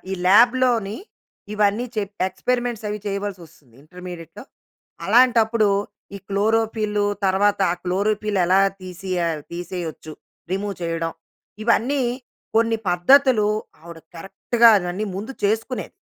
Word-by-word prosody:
ఈ - - -2
ల్యాబ్‌లోని 235 0 +4 0.6
ఇవన్నీ 210 +3 +1
చెప్పాక 200 -2 -2
ఎక్స్పెరిమెంట్స్ 240 +2 -2
అవి 210 0 -3
చేయవలసి 200 -1 -3
వస్తుంది 145 -7 -22
ఇంటర్మీడియేట్‌లో. 175 0 -10 0.6
అలాంటప్పుడు 230 -1 +4 0.5
ఈ - - -8
క్లోరోఫిల్ 215 +1 0 0.2
తర్వాత 200 +2 +2
ఆ - - -2
క్లోరోఫిల్ 205 +2 -1
ఎలా 190 +2 +4 0.2
తీసియాల్ 180 -3 -3
తీసేయోచ్చు 170 -3 -6 0.4
రిమూవ్ 200 +1 -2
చేయడం. 165 -1 -2 0.5
ఇవన్నీ 250 +4 +1 0.5
కొన్ని 230 0 +3
పద్ధతులు 215 +5 +4 0.3
ఆవిడ 170 0 -11 0.2
కరెక్ట్‌గా 230 +6 +3
అవన్నీ 180 +3 -4
ముందు 215 +7 -6
చేసుకునేది. 225 +5 -2
205 Hz, 105 wpm, -22 LUFS, 180-225 Hz, 0.6 s, ల్యాబ్‌లోని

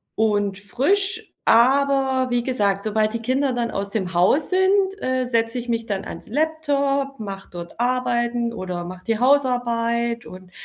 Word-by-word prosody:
und 205 -3 0
frisch. 375 - +1 0.2
Aber, 265 +1 +3
wie 240 -1 +1
gesagt, 200 -6 0
sobald 215 0 0
die 230 - -3
Kinder 260 +3 0
dann 235 -1 -2
aus 200 0 -3
dem 190 -5 -2
Haus 185 - +3
sind, 380 +1 +2
äh, 255 0 0
setze 230 -1 0
ich 240 - -8
mich 230 -1 -1
dann 200 -4 -3
ans - - -9
Laptop, 280 -1 -1
mache 195 -2 -7
dort 175 +3 -9
Arbeiten 240 -1 0
oder 180 -4 -5
mache 185 +1 -9
die 225 -1 0
Hausarbeit 235 -3 +1
und, 185 0 -12
235 Hz, 160 wpm, -22 LUFS, 210-270 Hz, 0.2 s, Aber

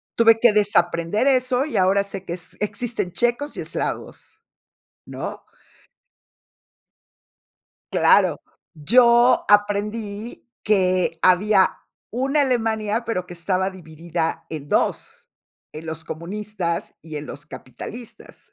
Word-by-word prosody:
Tuve 225 -1 +5
que 235 -3 +5
desaprender 200 +1 +2
eso, 255 0 +2
y 310 - -3
ahora 195 +2 +3
sé 195 -1 -7
que 170 - -4
es 175 -2 -7
existen 210 -2 -2
checos 240 +7 -1
y - - -3
eslavos, - - -5 0.6
¿no? - - -7 2.5
Claro. - - +4 0.3
Yo 240 +9 +4
aprendí 205 +2 0
que 185 -5 +1
había 190 +1 +4 0.3
una 275 +5 +1
Alemania, 225 -3 0
pero 185 -6 -3
que 175 - -9
estaba 185 +2 -1
dividida 165 -1 -4
en 150 -3 -7
2, - - -1 0.5
en 155 +1 -8
los 160 0 -5
comunistas 180 +1 -4
y 155 -2 -8
en 150 - -6
los 145 +1 -9
capitalistas. 155 - -11
200 Hz, 110 wpm, -22 LUFS, 170-230 Hz, 2.5 s, Tuve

